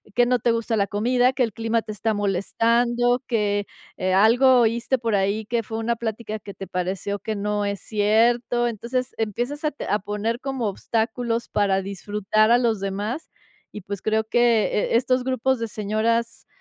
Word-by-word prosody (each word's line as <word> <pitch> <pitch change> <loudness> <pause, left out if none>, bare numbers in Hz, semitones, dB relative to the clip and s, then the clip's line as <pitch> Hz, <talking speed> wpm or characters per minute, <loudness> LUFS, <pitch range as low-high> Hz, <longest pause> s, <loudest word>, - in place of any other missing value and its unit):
que 245 - +5
no 250 0 +2
te 235 - +2
gusta 230 0 -1
la 200 -2 +1
comida, 245 +4 +2
que 260 -1 0
el 225 -4 -2
clima 225 +1 0
te 215 - -7
está 220 +2 -1
molestando, 235 +5 +1
que, 205 -3 0 0.3
eh, 185 0 -1
algo 245 +6 +5
oíste 235 +3 +1
por 230 -3 -1
ahí, 200 +2 0
que 230 +1 -1
fue 220 +1 -5
una 230 +1 0
plática 220 -1 -4
que 200 0 -10
te 195 - -8
pareció 190 +3 -3
que 215 +2 -4
no 210 0 -1
es 200 -1 -2
cierto. 235 +3 +2
Entonces, 240 +3 -3
empiezas 240 - -3
a 305 - +1
te 290 - -7
a 210 - +1
poner 210 +4 -3
como 265 -4 -2
obstáculos 230 +3 -2
para 195 -2 +1
disfrutar 205 +3 0
a 240 - +7
los 230 -5 0
demás 205 +9 -3 0.4
y, - - -7
pues, 195 +1 -6
creo 220 0 0
que, 235 -1 +3
eh, 220 - +1
estos 255 +1 +1
grupos 260 0 0
de 230 - -2
señoras 220 +3 -1
225 Hz, 185 wpm, -23 LUFS, 205-240 Hz, 0.4 s, a